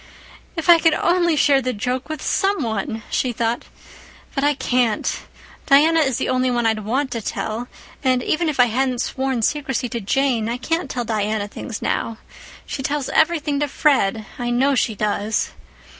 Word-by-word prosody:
"If 325 Hz, -1 st, -4 dB
I 345 Hz, -1 st, +8 dB
could 325 Hz, -1 st, +3 dB
only 345 Hz, -2 st, +2 dB
share 280 Hz, -2 st, +4 dB
the 255 Hz, 0 st, -2 dB
joke 250 Hz, +7 st, -3 dB
with 310 Hz, -, -5 dB
some 390 Hz, -5 st, +1 dB
one!" 220 Hz, 0 st, -3 dB
she 255 Hz, -, +1 dB
thought. 230 Hz, +1 st, -1 dB, 0.7 s
"But 275 Hz, -, -1 dB
I 290 Hz, 0 st, +3 dB
can't. 245 Hz, -5 st, 0 dB, 0.5 s
Diana 310 Hz, +4 st, +5 dB
is 265 Hz, -5 st, +1 dB
the -, -, -1 dB
only 255 Hz, 0 st, +1 dB
one 240 Hz, -1 st, 0 dB
I'd 220 Hz, -1 st, +1 dB
want 260 Hz, +5 st, -1 dB
to 230 Hz, -, -3 dB
tell, 220 Hz, +3 st, -4 dB, 0.4 s
and, 255 Hz, -2 st, +2 dB
even 325 Hz, +1 st, 0 dB
if 290 Hz, -, -4 dB
I 245 Hz, -, +8 dB
hadn't 250 Hz, +1 st, 0 dB
sworn 265 Hz, -3 st, -2 dB
secrecy 270 Hz, -2 st, 0 dB
to 235 Hz, 0 st, -4 dB
Jane, 235 Hz, 0 st, +1 dB
I 240 Hz, -, -2 dB
can't 330 Hz, +3 st, -2 dB
tell 245 Hz, -2 st, -3 dB
Diana 215 Hz, -1 st, -1 dB
things 220 Hz, +1 st, -7 dB
now. 225 Hz, -, -1 dB, 0.5 s
She -, -, -5 dB
tells 285 Hz, 0 st, -2 dB
everything 310 Hz, -3 st, +2 dB
to 295 Hz, -, +1 dB
Fred—I 240 Hz, -5 st, 0 dB
know 260 Hz, +4 st, +2 dB
she 230 Hz, -4 st, +1 dB
does. 210 Hz, +1 st, -1 dB
255 Hz, 175 wpm, -21 LUFS, 225-290 Hz, 0.7 s, I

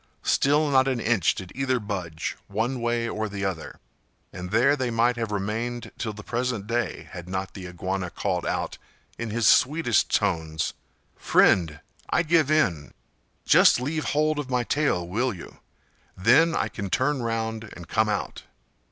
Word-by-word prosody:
Still 150 Hz, +2 st, +3 dB
not 130 Hz, -1 st, +4 dB
an 130 Hz, -3 st, 0 dB
inch 115 Hz, -7 st, +2 dB
did 95 Hz, -1 st, -8 dB
either 130 Hz, -1 st, 0 dB
budge, 90 Hz, -7 st, -4 dB
one 115 Hz, +5 st, -2 dB
way 120 Hz, 0 st, 0 dB
or 110 Hz, -1 st, -3 dB
the 100 Hz, 0 st, -4 dB
other, 90 Hz, -5 st, -5 dB, 0.5 s
and 90 Hz, 0 st, -6 dB
there 125 Hz, +8 st, +4 dB
they 130 Hz, -3 st, -2 dB
might 120 Hz, +1 st, +2 dB
have 115 Hz, -3 st, -3 dB
remained 115 Hz, +4 st, -3 dB
till 110 Hz, -, -2 dB
the 105 Hz, 0 st, -10 dB
present 120 Hz, -3 st, -2 dB
day, 115 Hz, -2 st, -2 dB
had 90 Hz, 0 st, -8 dB
not 95 Hz, +1 st, -3 dB
the 95 Hz, -3 st, -8 dB
Iguana 90 Hz, +1 st, -3 dB
called -, -, -2 dB
out, -, -, -3 dB, 0.4 s
in 115 Hz, -, -3 dB
his 115 Hz, +1 st, -1 dB
sweetest 140 Hz, -3 st, +3 dB
tones, 80 Hz, -1 st, 0 dB, 0.4 s
"Friend, 80 Hz, -4 st, +3 dB, 0.3 s
I -, -, +2 dB
give 160 Hz, -3 st, +3 dB
in! 90 Hz, -, +1 dB, 0.5 s
Just -, -, +6 dB
leave 150 Hz, +5 st, -2 dB
hold 155 Hz, +1 st, +1 dB
of 140 Hz, -3 st, -5 dB
my 125 Hz, -1 st, +1 dB
tail, 125 Hz, -, 0 dB
will 115 Hz, +5 st, -1 dB
you? 85 Hz, -, -12 dB, 0.6 s
then 135 Hz, -, +4 dB
I -, -, 0 dB
can 100 Hz, -1 st, -6 dB
turn 130 Hz, +5 st, +1 dB
round 110 Hz, -1 st, -3 dB
and 85 Hz, -2 st, -10 dB
come 110 Hz, +3 st, +1 dB
out." 105 Hz, -, -3 dB
115 Hz, 165 wpm, -25 LUFS, 95-130 Hz, 0.6 s, Just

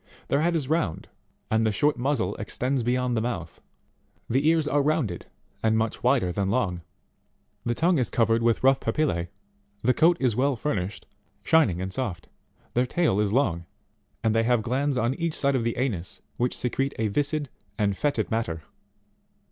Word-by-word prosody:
Their 140 Hz, -, +2 dB
head 170 Hz, +1 st, +2 dB
is 150 Hz, -5 st, -1 dB
round 150 Hz, -, -1 dB, 0.4 s
and 110 Hz, 0 st, +3 dB
the 110 Hz, -, +2 dB
short 145 Hz, +9 st, +2 dB
muzzle 120 Hz, -7 st, 0 dB
extends 125 Hz, +5 st, -2 dB
be 120 Hz, +1 st, +1 dB
yond 125 Hz, -1 st, 0 dB
the 110 Hz, -, +1 dB
mouth; 95 Hz, -9 st, -4 dB, 0.7 s
the 135 Hz, +5 st, +1 dB
ears 160 Hz, -2 st, +2 dB
are 145 Hz, -1 st, +2 dB
rounded, 140 Hz, -, -1 dB, 0.3 s
and 110 Hz, 0 st, +2 dB
much 110 Hz, 0 st, -1 dB
wider 125 Hz, -8 st, +2 dB
than 95 Hz, +2 st, -1 dB
long; 100 Hz, -6 st, 0 dB, 0.8 s
the 120 Hz, -, 0 dB
tongue 170 Hz, +1 st, +3 dB
is 125 Hz, -, +1 dB
covered 115 Hz, 0 st, +2 dB
with 115 Hz, +1 st, +1 dB
rough 135 Hz, 0 st, +5 dB
papillae; 90 Hz, -, -1 dB, 0.5 s
the 125 Hz, +2 st, +4 dB
coat 165 Hz, +4 st, +4 dB
is 125 Hz, -5 st, +1 dB
well 135 Hz, +3 st, +2 dB
furnished, 105 Hz, -7 st, -3 dB, 0.4 s
shining 150 Hz, -, +3 dB
and 95 Hz, 0 st, -3 dB
soft; 105 Hz, -8 st, -3 dB, 0.5 s
their 125 Hz, +1 st, +2 dB
tail 155 Hz, -, +1 dB
is 105 Hz, -1 st, +1 dB
long, 95 Hz, -9 st, +1 dB, 0.6 s
and 110 Hz, -, +2 dB
they 115 Hz, -, +3 dB
have 115 Hz, -1 st, +2 dB
glands 135 Hz, +3 st, 0 dB
on 120 Hz, +1 st, +1 dB
each 165 Hz, 0 st, -2 dB
side 140 Hz, 0 st, +1 dB
of 125 Hz, -, 0 dB
the 115 Hz, 0 st, -1 dB
anus 105 Hz, -9 st, -2 dB, 0.2 s
which 125 Hz, +1 st, 0 dB
secrete 135 Hz, +3 st, -1 dB
a 110 Hz, -, 0 dB
viscid 145 Hz, +6 st, -1 dB, 0.3 s
and 100 Hz, -3 st, +1 dB
foetid 130 Hz, -2 st, -1 dB
matter. 85 Hz, -8 st, -2 dB
120 Hz, 180 wpm, -26 LUFS, 110-140 Hz, 0.8 s, rough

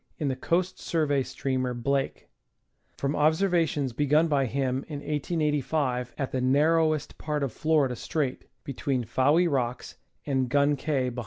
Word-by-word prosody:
in 150 Hz, -4 st, -1 dB
the 130 Hz, -, -1 dB
Coast 175 Hz, +7 st, -1 dB
Survey 150 Hz, -4 st, +1 dB
steamer 130 Hz, -1 st, -2 dB
Blake, 135 Hz, +3 st, -2 dB, 0.7 s
from 140 Hz, +1 st, -1 dB
observ 160 Hz, +6 st, +2 dB
ations 150 Hz, -7 st, 0 dB
begun 150 Hz, +4 st, +3 dB
by 140 Hz, -4 st, +1 dB
him 130 Hz, 0 st, -1 dB
in 150 Hz, -, -5 dB
1885 145 Hz, -4 st, -1 dB
at 135 Hz, -, -3 dB
the 130 Hz, -, -1 dB
narrowest 155 Hz, +3 st, +2 dB
part 150 Hz, -2 st, -2 dB
of 135 Hz, -, -2 dB
Florida 150 Hz, -5 st, +1 dB
Strait, 135 Hz, +1 st, -3 dB, 0.2 s
between 135 Hz, -2 st, -2 dB
Fowey 145 Hz, +9 st, +3 dB
Rocks 125 Hz, -5 st, -2 dB, 0.3 s
and 130 Hz, -3 st, 0 dB
Gun 145 Hz, +2 st, +3 dB
Cay 135 Hz, -2 st, -1 dB
(Bah.) 125 Hz, 0 st, -6 dB
140 Hz, 150 wpm, -27 LUFS, 130-155 Hz, 0.7 s, begun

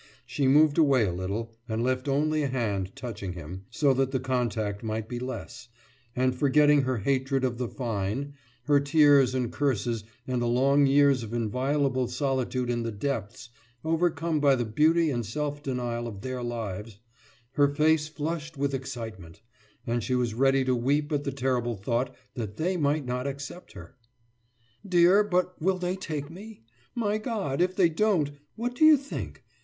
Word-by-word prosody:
She 140 Hz, -, -1 dB
moved 150 Hz, +3 st, +5 dB
away 135 Hz, -7 st, +4 dB
a 90 Hz, -, -2 dB
little 100 Hz, +6 st, -4 dB, 0.2 s
and 110 Hz, +1 st, -1 dB
left 130 Hz, +1 st, -1 dB
only 155 Hz, +3 st, +1 dB
a 145 Hz, -, 0 dB
hand 105 Hz, -7 st, -2 dB
touching 100 Hz, -7 st, -6 dB
him, 90 Hz, +3 st, -8 dB
so 140 Hz, -3 st, +2 dB
that 135 Hz, 0 st, +1 dB
the 130 Hz, -1 st, -1 dB
contact 115 Hz, -5 st, -1 dB
might 110 Hz, -1 st, -3 dB
be 120 Hz, 0 st, -5 dB
less; 125 Hz, -1 st, -7 dB, 0.5 s
and 130 Hz, 0 st, +2 dB
forgetting 145 Hz, +2 st, +4 dB
her 130 Hz, -2 st, -1 dB
hatred 135 Hz, +4 st, 0 dB
of 125 Hz, -2 st, -1 dB
the 125 Hz, -, -1 dB
Fine, 120 Hz, +3 st, -3 dB, 0.3 s
her 145 Hz, +1 st, +4 dB
tears 140 Hz, -3 st, +4 dB
and 125 Hz, -2 st, -1 dB
curses, 120 Hz, -5 st, -1 dB, 0.2 s
and 125 Hz, -1 st, -1 dB
the 120 Hz, -, 0 dB
long 135 Hz, +4 st, +3 dB
years 140 Hz, -1 st, +4 dB
of 115 Hz, 0 st, -7 dB
inviolable 130 Hz, +3 st, 0 dB
solitude 130 Hz, -1 st, -1 dB
in 120 Hz, -1 st, -1 dB
the 115 Hz, 0 st, -3 dB
depths 115 Hz, 0 st, -4 dB, 0.3 s
overcome 165 Hz, -1 st, 0 dB
by 140 Hz, -2 st, +4 dB
the 120 Hz, -2 st, -1 dB
beauty 155 Hz, +8 st, +3 dB
and 120 Hz, -3 st, -1 dB
self 145 Hz, +6 st, -3 dB
denial 120 Hz, -4 st, -3 dB
of 100 Hz, -4 st, -8 dB
Their 130 Hz, +1 st, -4 dB
lives 110 Hz, -3 st, -5 dB, 0.5 s
her 145 Hz, +1 st, +4 dB
face 150 Hz, +2 st, +2 dB
flushed 155 Hz, 0 st, -5 dB
with 140 Hz, 0 st, -1 dB
excitement, 110 Hz, -10 st, -7 dB, 0.4 s
and 120 Hz, 0 st, -1 dB
she 130 Hz, -, 0 dB
was 120 Hz, -3 st, 0 dB
ready 135 Hz, +2 st, +3 dB
to 130 Hz, -, +2 dB
weep 145 Hz, +5 st, 0 dB
at 145 Hz, -1 st, -1 dB
the 140 Hz, -, -1 dB
terrible 125 Hz, -3 st, -1 dB
thought 120 Hz, +6 st, -2 dB, 0.2 s
that 110 Hz, -4 st, -5 dB
They 180 Hz, +4 st, 0 dB
might 150 Hz, -3 st, 0 dB
not 125 Hz, +2 st, -2 dB
accept 140 Hz, +6 st, -7 dB
her. 85 Hz, -1 st, -12 dB, 0.9 s
»Dear, 180 Hz, +1 st, +5 dB
but 180 Hz, -3 st, -1 dB
will 185 Hz, +3 st, +2 dB
they 180 Hz, 0 st, -2 dB
take 155 Hz, -5 st, -5 dB
me? 205 Hz, -, -11 dB, 0.3 s
My 215 Hz, -3 st, 0 dB
God, 205 Hz, -, -2 dB
if 185 Hz, +1 st, +1 dB
they 185 Hz, -3 st, +5 dB
won't! 165 Hz, -5 st, +1 dB, 0.2 s
What 240 Hz, +2 st, -3 dB
do 245 Hz, -, 0 dB
you 310 Hz, -1 st, +8 dB
think? 280 Hz, +1 st, -7 dB
135 Hz, 175 wpm, -27 LUFS, 120-150 Hz, 0.9 s, you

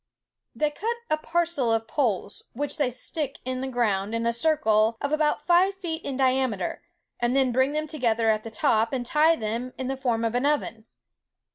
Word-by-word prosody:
"They 300 Hz, -1 st, +1 dB
cut 450 Hz, +10 st, -2 dB, 0.2 s
a 310 Hz, -, +3 dB
parcel 330 Hz, -6 st, 0 dB
of 225 Hz, 0 st, 0 dB
poles, 215 Hz, -8 st, -1 dB
which 290 Hz, +5 st, -3 dB
they 285 Hz, -5 st, +2 dB
stick 275 Hz, +3 st, -4 dB
in 255 Hz, 0 st, -3 dB
the 265 Hz, -, -2 dB
ground 220 Hz, -4 st, 0 dB
in 230 Hz, 0 st, -1 dB
a 235 Hz, -, +2 dB
circle 230 Hz, -6 st, +2 dB
of 280 Hz, -, -2 dB
about 305 Hz, -1 st, +1 dB
five 365 Hz, +3 st, +4 dB
feet 340 Hz, -4 st, -4 dB, 0.2 s
diameter, 260 Hz, -7 st, 0 dB, 0.4 s
and 240 Hz, +2 st, +1 dB
then 265 Hz, -2 st, +3 dB
bring 260 Hz, +3 st, +2 dB
them 305 Hz, 0 st, -1 dB
together 235 Hz, -7 st, 0 dB
at 215 Hz, 0 st, 0 dB
the 225 Hz, -, -6 dB
top, 220 Hz, +1 st, +1 dB
and 250 Hz, -2 st, -2 dB
tie 310 Hz, +5 st, +4 dB
them 235 Hz, +1 st, -4 dB
in 260 Hz, 0 st, -3 dB
the 270 Hz, -, -1 dB
form 235 Hz, -4 st, 0 dB
of 225 Hz, -, -1 dB
an 250 Hz, +3 st, +1 dB
oven. 230 Hz, -7 st, -1 dB
255 Hz, 190 wpm, -26 LUFS, 230-300 Hz, 0.4 s, five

